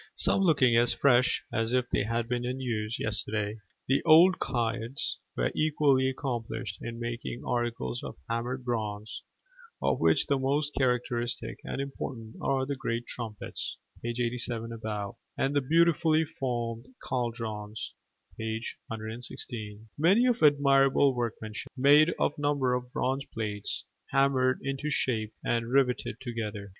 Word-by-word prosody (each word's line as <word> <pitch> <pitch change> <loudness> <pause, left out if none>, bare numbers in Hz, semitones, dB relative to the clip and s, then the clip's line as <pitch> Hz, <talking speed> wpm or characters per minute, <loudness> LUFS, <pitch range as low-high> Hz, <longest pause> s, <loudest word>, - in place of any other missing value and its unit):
some - - +2
looking 140 -10 +4
as 120 +1 +4
fresh 130 -2 +3
as 115 +1 0
if 125 -1 +3
they - - +2
had 115 +2 -1
been 125 0 -1
in 125 +2 -3
use 115 -3 -2
yesterday. 105 0 -1 0.3
The 135 - +3
old 170 +3 +7
cairds 120 0 -1 0.2
were - - +1
equally 145 -4 +3
accomplished 120 -5 -4
in 115 0 -6
making 120 0 -4
articles 115 - -1
of - - -7
hammered 125 +2 -2
bronze, 110 -3 -3 0.6
of - - +1
which - - +4
the 140 -2 +1
most 140 +2 +1
characteristic 125 -2 0
and - - -4
important 130 -5 -5
are 135 -1 +1
the 140 +1 -2
great 120 -2 -2
trumpets 110 -4 -5 0.2
(page 120 +1 -3
87 115 -1 -1
above) 105 -3 -4 0.2
and 135 +2 0
the 145 - +4
beautifully 160 +2 +3
formed 120 -4 -3 0.2
caldrons 115 -4 -3 0.5
(page 110 +1 -3
116) 110 -1 -6
many 195 +10 +5
of 245 -2 +2
admirable 140 -1 +5
workmanship 110 -2 -4
made 145 +5 +6
of - - +2
a - - -5
number 140 -3 +2
of 125 0 -3
bronze 135 -1 0
plates, 105 -2 -3 0.2
hammered 135 -1 +3
into 135 +2 -2
shape 115 -7 0
and 115 -1 +1
riveted 125 -4 +2
together. 110 -5 -5
120 Hz, 140 wpm, -29 LUFS, 115-135 Hz, 0.6 s, old